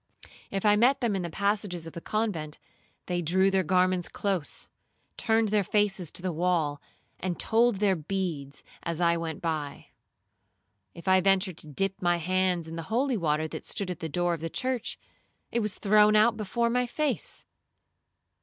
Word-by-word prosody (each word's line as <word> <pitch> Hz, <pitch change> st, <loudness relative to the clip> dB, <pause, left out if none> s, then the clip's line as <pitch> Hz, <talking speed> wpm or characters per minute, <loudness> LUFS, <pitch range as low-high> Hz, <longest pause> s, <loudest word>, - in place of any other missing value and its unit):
If 195 Hz, +1 st, -3 dB
I 210 Hz, 0 st, +6 dB
met 250 Hz, +5 st, +4 dB
them 230 Hz, -5 st, 0 dB
in 190 Hz, -, -1 dB
the 170 Hz, -, -4 dB
passages 200 Hz, -2 st, -1 dB
of 165 Hz, -, -9 dB
the 170 Hz, -, -7 dB
convent, 180 Hz, -9 st, -2 dB, 0.5 s
they 175 Hz, -1 st, -1 dB
drew 190 Hz, +4 st, +3 dB
their 190 Hz, 0 st, +3 dB
garments 185 Hz, 0 st, +2 dB
close, 190 Hz, -7 st, -3 dB, 0.5 s
turned 225 Hz, -1 st, +2 dB
their 210 Hz, 0 st, +2 dB
faces 195 Hz, -3 st, +1 dB
to 175 Hz, -, -2 dB
the 185 Hz, -2 st, -1 dB
wall, 160 Hz, -4 st, 0 dB, 0.4 s
and 180 Hz, -1 st, -3 dB
told 235 Hz, 0 st, +3 dB
their 195 Hz, -1 st, +2 dB
beads 160 Hz, -5 st, -4 dB, 0.2 s
as 170 Hz, -1 st, -3 dB
I 170 Hz, -1 st, +3 dB
went 165 Hz, -1 st, -4 dB
by. 155 Hz, -4 st, -3 dB, 1.1 s
If 170 Hz, +2 st, -11 dB
I 185 Hz, 0 st, +5 dB
ventured 190 Hz, -2 st, +2 dB
to -, -, -11 dB
dip 195 Hz, +6 st, -2 dB
my 175 Hz, -1 st, +2 dB
hands 180 Hz, 0 st, 0 dB
in 165 Hz, +1 st, -7 dB
the -, -, -3 dB
holy 255 Hz, +3 st, +1 dB
water 155 Hz, -5 st, 0 dB
that -, -, -7 dB
stood 195 Hz, -4 st, -2 dB
at 175 Hz, -, -6 dB
the 160 Hz, -, -4 dB
door 175 Hz, +3 st, 0 dB
of 165 Hz, -, -5 dB
the 165 Hz, -, -3 dB
church, 255 Hz, +4 st, -2 dB, 0.5 s
it 235 Hz, -, +1 dB
was 210 Hz, -3 st, -2 dB
thrown 210 Hz, +1 st, +4 dB
out 220 Hz, +2 st, +5 dB
before 235 Hz, +3 st, -1 dB
my 250 Hz, 0 st, +1 dB
face. 265 Hz, -, -1 dB
185 Hz, 180 wpm, -28 LUFS, 170-210 Hz, 1.1 s, I